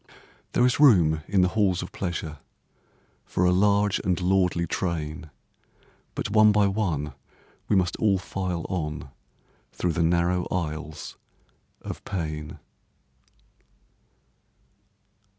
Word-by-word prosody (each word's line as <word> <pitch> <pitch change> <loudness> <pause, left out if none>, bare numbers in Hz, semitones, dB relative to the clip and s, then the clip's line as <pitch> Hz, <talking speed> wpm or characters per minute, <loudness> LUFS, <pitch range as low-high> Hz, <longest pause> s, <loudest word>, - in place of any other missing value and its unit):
There 125 - +4
is 125 - +1
room 85 - +5
in 95 -1 +3
the 90 - +3
halls 95 -4 +1
of 90 - -9
pleasure 80 -5 -4 0.8
For 90 - 0
a 90 - +4
large 100 +2 +3
and 90 -1 0
lordly 90 -2 +2
train, 80 -3 -3 0.9
But 105 - -3
one 110 0 +6
by 105 -1 +3
one 85 -8 -1 0.5
we - - +2
must 90 -2 +1
all 100 -3 +3
file 90 -2 -4
on 75 -6 -4 0.6
Through 90 - -1
the 85 - 0
narrow 85 +2 +1
aisles 80 -3 -4 0.7
of - - -7
pain. 75 -6 -4
90 Hz, 115 wpm, -26 LUFS, 80-100 Hz, 0.9 s, one